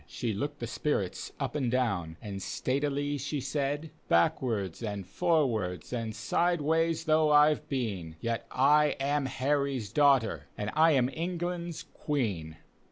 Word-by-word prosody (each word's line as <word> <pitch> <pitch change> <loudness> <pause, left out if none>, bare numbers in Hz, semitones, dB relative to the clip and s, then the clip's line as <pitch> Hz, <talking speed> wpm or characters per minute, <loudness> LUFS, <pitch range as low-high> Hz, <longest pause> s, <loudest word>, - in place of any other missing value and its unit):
She 115 - -3
looked 145 +8 -3
the 120 - -4
spirits 115 -6 -2
up - - -2
and 135 -5 0
down 100 -10 -1
and 100 -3 -5
statclily 145 +7 -1
she 145 +2 -2
said: 145 +3 -2
— - - -33
" - - -34
Backwards 100 +2 +1
and 100 -4 -4
forwards 115 - 0
and 115 -3 -3
sideways 165 +5 +1
though 155 0 +3
I've 150 0 +4
been, 100 - -3
Yet 115 0 -3
I 150 +3 +4
am 140 0 0
Harty's 135 -4 -1
daug^te; 140 -6 +4 0.2
and 105 +1 -3
I 160 +1 +5
am 130 -3 +3
England's 175 0 -3
Queen! 100 - -3
135 Hz, 145 wpm, -30 LUFS, 110-150 Hz, 0.2 s, I